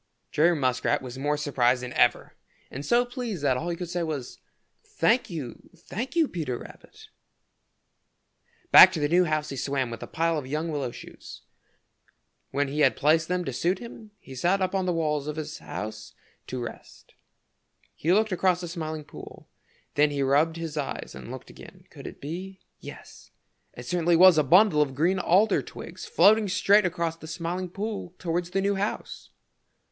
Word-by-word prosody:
Jerry 170 +3 +3
Muskrat 130 -3 0
was 130 0 -8
more 145 +2 0
surprised 130 -4 +1
than 125 0 -6
ever 120 -2 +2 0.4
and 135 - -6
so 240 - +3
pleased 245 - -5
that 135 -3 +3
all 160 +7 -3
he 170 - -2
could 175 0 -6
say 175 +1 -3
was, 150 -6 -5 0.4
"Thank 335 - +1
you, 150 -9 -7
thank 230 - -6
you, 330 -3 +3
Peter 150 - -4
Rabbit!" - - -14 1.6
Back 185 - +10
to 165 - -2
the 145 - +1
new 175 +4 +3
house 155 -1 -1
he 135 - -5
swam 135 -2 -2
with 115 - -6
the - - -8
pile 165 -1 0
of 130 - -9
young 155 +4 -2
willow 140 -4 -2
shoots. - - -12 1.1
When 140 +1 -1
he 145 +2 -4
had 150 - +4
placed 155 +2 +2
them 180 0 -1
to 135 - -4
suit 175 +9 0
him 225 0 -11
he 135 - -13
sat 175 +9 +1
up 185 0 -1
on 190 -1 0
the - - +2
walls 150 -3 -1
of 150 - -3
his 155 -1 -6
house 110 +1 -7 0.3
to 130 - -5
rest. 120 -1 -10 0.8
He 165 - -1
looked 215 +3 +3
across 180 0 +2
the 175 - -6
Smiling 160 -2 -5
Pool. 145 - -12 0.5
Then 150 +1 +3
he 140 -1 -1
rubbed 145 +4 +2
his 165 -2 -5
eyes 145 - -4
and 65 -1 -10
looked - - -9
again. - - -14
Could - - -10
it - - -10
be 185 +6 -7 0.2
yes, - - -12 0.4
it 120 - -10
certainly 175 +3 +1
was 180 -1 +7
a - - +3
bundle 175 +2 +5
of 135 -3 -1
green 175 +7 +1
alder 195 +5 +3
twigs 460 - -10
floating 220 - +4
straight 200 +1 +4
across 170 -2 -2
the 160 - -11
Smiling 170 +3 -4
Pool 200 -2 -5
towards 175 0 -2
the 195 +2 -1
new 200 +1 +1
house! 200 +2 -4
165 Hz, 185 wpm, -26 LUFS, 145-185 Hz, 1.6 s, Back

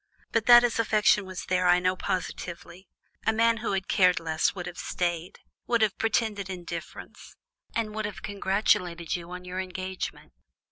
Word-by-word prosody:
But 230 -1 0
that 240 0 +9
his 235 -1 +1
affection 210 -2 +3
was 185 -1 -6
there, 185 0 +1
I 175 0 +6
know 185 +1 +1
positively. 180 0 -5 0.4
A - - +6
man 230 +1 +3
who 225 -3 -2
had 190 0 -2
cared 180 -2 +4
less 160 +1 0
would 180 -2 -5
have 175 0 -7
stayed, 175 0 -3 0.3
would 235 -2 +3
have 210 -3 0
pretended 215 -3 0
indifference, 175 -2 -8 0.4
and 220 -2 -1
would 215 0 -3
have 205 -2 -6
congratulated 190 -4 0
you 170 -1 -7
on 180 0 -8
your 180 +1 -5
engagement." 185 - -5
185 Hz, 170 wpm, -27 LUFS, 180-215 Hz, 0.4 s, that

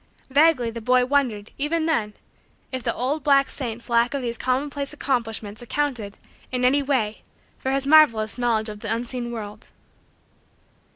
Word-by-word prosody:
Vaguely 285 -5 +4
the 230 0 -7
boy 250 +2 +3
wondered, 250 -6 0
even 315 +3 0
then, 220 -10 0 0.6
if 260 -1 -3
the - - -1
old 275 +4 -1
black 275 -1 +4
saint's 235 -4 -6
lack 235 +3 +2
of 275 - -3
those 235 -1 -2
commonplace 280 +3 -2
accomplishments 225 -6 -2
accounted, 240 -5 -3 0.3
in 250 -1 0
any 280 +3 +4
way, 255 -7 -1 0.4
for 265 - -3
his 275 0 0
marvelous 250 -8 +4
knowledge 230 -3 +1
of 210 -1 -7
the - - -3
unseen 240 +1 -2
world. 210 -3 -7
250 Hz, 155 wpm, -23 LUFS, 225-280 Hz, 0.6 s, Vaguely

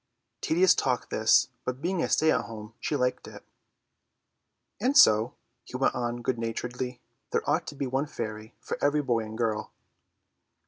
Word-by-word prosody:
Tedious 180 +3 +4
talk 125 -2 -1
this, 110 0 +4
but 125 0 -3
being 175 +3 -1
a - - -1
stay 160 0 +3
at 120 - +1
home 110 -1 -9
she 150 - -2
liked 125 -2 -1
it. - - -11 1.4
"And 260 +7 +2
so," 110 - +6 0.3
he 125 - -7
went 135 - +2
on 120 -1 -3
good 120 -1 -1
naturedly, 125 +2 -4 0.3
"there - - -1
ought - - +1
to 145 - -6
be 140 - -3
one 135 +3 -1
fairy 110 -2 -6
for - - -6
every 145 +1 +2
boy 120 -4 +1
and 110 0 -6
girl." 110 -2 -1
125 Hz, 170 wpm, -28 LUFS, 115-140 Hz, 1.4 s, so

